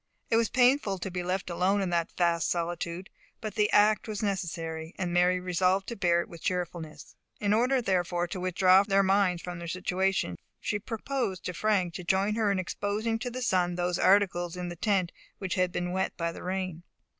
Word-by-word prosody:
It - - +4
was 230 -1 +3
painful 250 -5 +3
to 185 +1 -5
be 180 0 -3
left 180 +2 -2
alone 185 +4 +2
in 190 -2 -1
that 170 -1 0
vast 170 -1 +2
solitude. 170 +1 -3 0.3
But 215 -2 -5
the 210 0 +2
act 210 +1 +4
was 215 -1 -4
necessary, 165 -4 -3
and 175 -2 -2
Mary 180 +1 +3
resolved 185 +2 +1
to 235 - -4
bear 175 -3 +2
it - - -7
with 170 -2 -12
cheerfulness. 170 -3 -4 0.2
In 205 0 +1
order 250 +3 +2
therefore 175 -3 0
to 185 - -4
withdraw 185 +1 +5
their 195 -1 +2
minds 190 -2 +2
from 180 -1 -6
their 170 - -6
situation, 185 - -1 0.2
she 210 - -2
proposed 225 -3 -3
to 180 - -3
Frank 185 -2 +1
to 180 - -6
join 190 +4 +1
her 215 -2 +1
in 200 - 0
exposing 210 +4 -2
to 245 +2 -3
the 250 +1 -5
sun 180 -6 +1
those 180 0 -1
articles 180 -3 +3
in 180 0 -4
the 175 - -6
tent 185 -1 +1 0.3
which 190 -3 -3
had 185 -1 +1
been 175 0 -2
wet 190 +1 -2
by 170 -1 -1
the - - -10
rain. 185 -2 -3
185 Hz, 200 wpm, -29 LUFS, 175-205 Hz, 0.3 s, withdraw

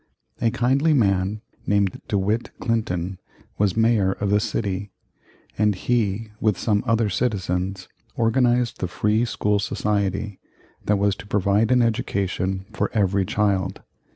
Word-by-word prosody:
A 115 - +3
kindly 135 +6 +2
man 100 -3 +1 0.3
named 100 -2 +1
De 100 - 0
Witt 105 +4 0
Clinton 95 -6 -2 0.4
was 100 0 +1
Mayor 110 -4 +3
of 100 0 -2
the 105 - +4
city, 100 -1 -2 0.7
and 105 -1 +3
he, 110 0 0
with 105 -4 +1
some 105 -3 +1
other 115 -1 +2
citizens, 95 -3 -1 0.3
organized 120 +1 +2
the 90 - -1
Free 105 +6 +1
School 105 -3 0
Society 105 -1 -1 0.5
that 105 - +2
was 100 0 +2
to - - -11
provide 100 +2 +2
an 125 -1 +4
education 95 -4 -1
for - - -1
every 100 -2 +2
child. 100 -2 0
105 Hz, 135 wpm, -23 LUFS, 95-115 Hz, 0.7 s, the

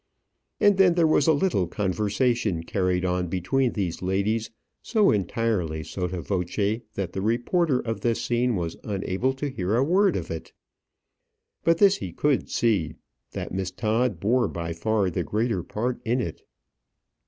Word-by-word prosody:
And 205 -2 +5
then 180 -3 +6
there 170 -2 +4
was 155 -2 +3
a - - +7
little 150 - +1
conversation 105 0 0
carried 90 0 0
on 90 0 0
between 95 +9 0
these 95 -6 -3
ladies 100 +4 0 0.3
so 215 -4 +3
entirely 95 -5 -1
sotto 90 0 -4
voce 100 +4 -1
that 95 -3 -3
the 95 - -3
reporter 125 - +1
of 115 -3 -4
this 115 0 +1
scene 120 0 +1
was 85 -3 -3
unable 100 +4 -1
to 135 +2 -3
hear 100 -4 -1
a 125 - +3
word 185 +5 +3
of 85 -2 -4
it. 80 - -7 1.1
But 165 0 +3
this 200 0 +5
he 90 - -6
could 145 +7 +1
see, 95 -10 +1 0.4
that - - -5
Miss 95 -1 -2
Todd 110 +1 0
bore 120 +6 +2
by 85 -1 -4
far 100 +2 0
the 90 +1 -1
greater 110 0 -1
part 120 +7 -3
in 120 +3 +1
it. 85 -10 -5
105 Hz, 160 wpm, -25 LUFS, 90-125 Hz, 1.1 s, a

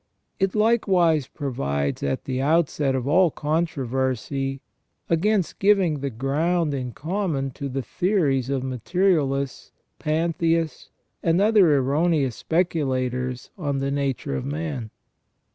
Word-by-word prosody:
It 195 0 +1
likewise 190 - +3
provides 70 - -2
at 70 -1 -2
the 130 -1 -2
outset 150 -2 +2
of 130 0 -2
all 175 +4 +5
controversy 135 -4 -1 0.5
against 190 +2 +1
giving 190 -7 +3
the 140 +1 -2
ground 150 +6 0
in 130 -3 -3
common 155 - -2
to 140 +2 -5
the 135 0 -3
theories 145 - 0
of 135 -2 -1
materialists, 140 - 0 0.3
pantheists, 165 +1 0 0.3
and 165 +1 +2
other 200 -7 +5
erroneous 140 -1 +1
speculators 130 -7 -1
on 145 -4 -1
the 135 0 -1
nature 140 0 -2
of - - -3
man. 145 -4 -4
145 Hz, 115 wpm, -24 LUFS, 130-170 Hz, 0.5 s, all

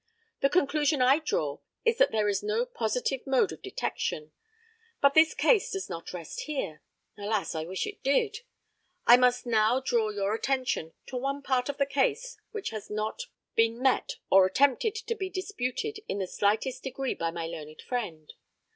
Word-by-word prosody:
The 275 - +3
conclusion 295 -3 +2
I 260 +4 +5
draw 150 - -1 0.3
is 460 0 +2
that - - +5
there 215 -1 +1
is 200 -1 +1
no 445 +3 0
positive 250 - -1
mode 270 +8 +3
of - - -9
detection. 150 0 -3 0.7
But 280 -1 +5
this 320 +1 +5
case 450 -6 +3
does 390 -3 -4
not 165 - -6
rest 170 -3 -6
here. 215 - -3 0.4
Alas, 205 0 -1
I 160 -1 -3
wish 185 +3 -3
it 410 -1 -8
did! 410 - +1 0.7
I 240 - +10
must 250 0 +3
now 225 +1 +3
draw 235 -4 +1
your 205 0 -1
attention 255 -9 -1
to 255 - -5
one 275 +2 -2
part 255 -1 +1
of 285 - -3
the 280 - +2
case 460 - 0
which 425 - -4
has 215 -2 -7
not 215 - -3 0.3
been 230 +1 +2
met 260 0 +1 0.2
or 190 -1 +7
attempted 280 - +2
to 460 +1 -3
be 385 -4 -4
disputed 375 - -3
in - - -2
the 195 - -1
slightest 215 +7 0
degree 265 0 -3
by 165 - -2
my 165 0 -4
learned 155 -2 -8
friend. 175 -12 -4
255 Hz, 175 wpm, -28 LUFS, 210-310 Hz, 0.7 s, I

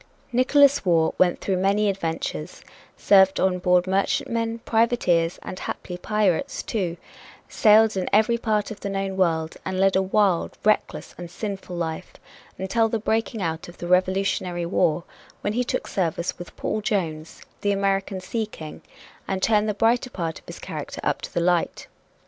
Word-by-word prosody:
Nickolas 280 +3 +4
Waugh 165 -3 +2
went 180 -1 +3
through 190 -2 0
many 200 +3 +2
adventures, 165 - -3 0.3
served 190 -1 +5
on 185 -1 +1
board 180 0 +3
merchantmen, 225 +4 0
privateers 220 -8 +2
and 185 - -7
haply 180 - -5
pirates, 210 - 0
too, 180 -7 -2 0.5
sailed 220 -1 +5
to 190 -1 -1
every 235 +2 +3
part 215 -2 0
of 210 - -8
the 200 - -4
known 195 -1 -2
world, 165 -4 0
and 185 0 -3
led 195 0 +3
a 190 - +4
wild, 190 -2 +1
reckless 215 0 0
and 175 -1 -7
sinful 190 -1 -6
life, 165 0 -4 0.4
until 225 +4 +1
the 225 - 0
breaking 220 -1 -1
out 165 0 -3
of 175 - -13
the - - -6
Revolutionary 185 -1 +1
War, 170 -1 +1 0.4
when 205 - -1
he 245 +2 +1
took - - -2
service 170 -2 -2
with 175 - -10
Paul 215 - -2
Jones, 165 -7 -3 0.2
the 205 - +1
American 195 -1 0
Sea 220 +4 -3
King, 155 -7 -10 0.5
and 190 -1 -1
turned 215 -1 +3
the 210 - -1
brighter 235 +4 +2
part 165 -8 -4
of - - -29
his - - -8
character - - -7
up - - 0
to - - -7
the 170 - -1
light. 175 0 0
195 Hz, 165 wpm, -24 LUFS, 175-215 Hz, 0.5 s, served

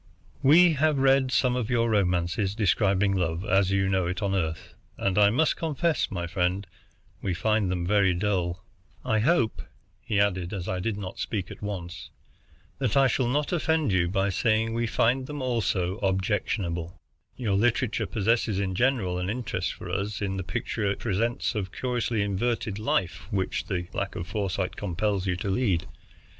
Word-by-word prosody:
We 165 +5 +6
have 155 0 +2
read 135 -1 +4
some 125 -1 +2
of 125 -4 -2
your 120 -2 +2
romances 95 -1 +1
describing 100 -2 +2
love 85 0 -1
as 95 -1 +3
you 95 0 +2
know 95 -2 +1
it 90 +2 -2
on 100 -1 0
Earth, 80 -4 -2 0.2
and 95 -1 0
I 105 0 +6
must 145 +9 +2
confess, 160 0 0
my 90 -3 -3
friend, 90 +2 -1 0.6
we 95 -3 -1
find 105 +1 +1
them 90 -1 -1
very 95 -1 +3
dull. 90 -2 -1 0.4
"I 110 - +2
hope," 120 -2 +2 0.4
he 105 - 0
added, 95 -2 0
as 95 -3 -4
I 90 - -2
did 100 +2 -2
not 95 -2 -5
at 100 -5 -4
once 95 -4 -4
speak, 95 - -17
"that 130 -3 +1
I 135 - +6
shall 130 0 +1
not 145 +6 0
offend 160 -6 +1
you 90 -2 +2
by 95 +2 +1
saying 110 +3 +1
we 115 0 0
find 130 +4 +1
them 150 -1 -5
also 110 -7 -1
objectionable. 95 -3 -1 0.4
Your 115 -6 -1
literature 110 +1 +1
possesses 110 -2 +1
in 95 -2 -1
general 100 -5 +1
an 90 +1 -2
interest 100 -6 -2
for - - -9
us 100 +2 -2
in 100 -1 -2
the 95 - -3
picture 105 +3 -2
it 100 - -1
presents 115 +4 -1
of 105 -4 -1
the - - -15
curiously 120 -4 0
inverted 105 +1 -1
life 90 -5 -1
which 95 -2 -1
the 90 -4 -2
lack - - -3
of 85 - -4
foresight 95 -1 -2
compels 100 0 -1
you 90 - +1
to 100 +2 -3
lead. 95 -6 +1
100 Hz, 175 wpm, -27 LUFS, 95-115 Hz, 0.6 s, We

